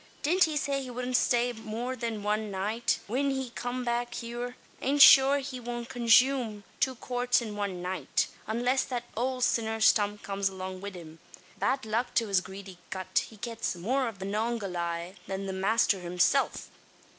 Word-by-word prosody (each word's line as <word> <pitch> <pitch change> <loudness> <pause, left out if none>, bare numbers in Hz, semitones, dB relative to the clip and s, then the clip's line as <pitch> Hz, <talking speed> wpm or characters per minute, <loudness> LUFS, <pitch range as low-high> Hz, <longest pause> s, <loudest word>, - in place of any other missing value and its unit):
Didn't 350 +5 +4
he 310 -2 -2
say 275 -1 -1
he 260 - -7
wudn't 250 +1 -3
stay 245 0 +2
more 225 +3 -4
than 225 -4 -4
wan 210 +1 0
night, 210 +5 0
whin 265 +6 0
he 265 -2 -2
come 245 +1 -4
back 240 0 -1
heeur; 240 +1 -5 0.3
an 280 +2 +1
shure 275 0 +9
he 265 -2 -5
won't 240 0 -5
conshume 240 -2 +3 0.2
two 260 -1 +1
quarts 245 +1 +1
in 220 -3 -5
wan 195 -4 -3
night 185 +1 0 0.2
unless 245 +4 +1
that 245 -2 -3
owld 255 +2 -1
sinner 225 -2 +1
Stump 210 -1 +3
comes 195 0 -1
along 185 -1 -6
wid 200 -1 -6
him. 165 -2 -11 0.4
Bad 255 +6 0
luck 225 +3 -1
to 230 -2 +2
his 195 -2 +3
greedy 190 -1 -10
gut! 185 -1 -1
he 220 - -14
gets 230 -3 -3
more 250 +9 0
av 225 -3 -6
the 190 - -6
Manongahayla 195 -5 -2
than 195 0 -4
the 190 - -3
masther 195 +1 +2
himsilf. 180 +9 +1
230 Hz, 175 wpm, -29 LUFS, 195-250 Hz, 0.4 s, shure